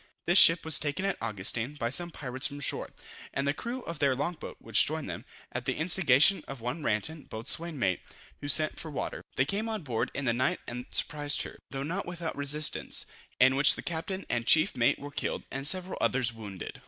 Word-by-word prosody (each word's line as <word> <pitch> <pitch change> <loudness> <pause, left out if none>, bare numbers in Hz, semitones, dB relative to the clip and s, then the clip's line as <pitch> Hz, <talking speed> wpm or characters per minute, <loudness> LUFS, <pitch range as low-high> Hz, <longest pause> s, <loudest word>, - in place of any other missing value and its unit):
This 175 +3 +6
ship 165 0 +7
was 160 - +5
taken 150 +6 -3
at 195 - -2
Augustin, 115 +5 0
by 120 -5 -3
some 175 +6 0
pirates 130 -4 -2
from 145 0 -8
shore, 140 - -2 0.5
and 140 0 -1
the 140 - +2
crew 245 +8 -6
of 170 -2 -7
their 140 -2 +2
long 145 +7 -2
boat, 160 - -10
which 115 -2 +2
joined 155 0 -3
them, 90 +7 -7 0.3
at 120 0 -5
the 130 - -1
instigation 160 0 +4
of 135 -2 -7
one 125 +8 -4
Ranten, 145 +7 0
boatswain's 155 +9 +2
mate, 95 -8 0 0.4
who 145 - -6
sent 155 +2 +3
for 160 - -7
water. 145 - -5
They 130 - +2
came 205 +8 -2
on 215 -5 -4
board 120 -6 -2
in 140 - -3
the 120 - +2
night 130 +3 0
and 125 +1 -7
surprised 145 -1 +1
her, - - -10
though 135 0 -4
not 180 +7 -4
without 170 -2 -5
resistance, 145 +1 0 0.3
in 130 +1 +5
which 140 +1 +5
the - - -7
captain 180 +3 -4
and 120 -1 -2
chief 155 - +4
mate 115 -1 +2
were 145 0 -9
killed, - - -3
and 135 +1 -2
several 185 +2 0
others 125 -3 +1
wounded. 105 -5 -8
145 Hz, 215 wpm, -29 LUFS, 125-165 Hz, 0.5 s, ship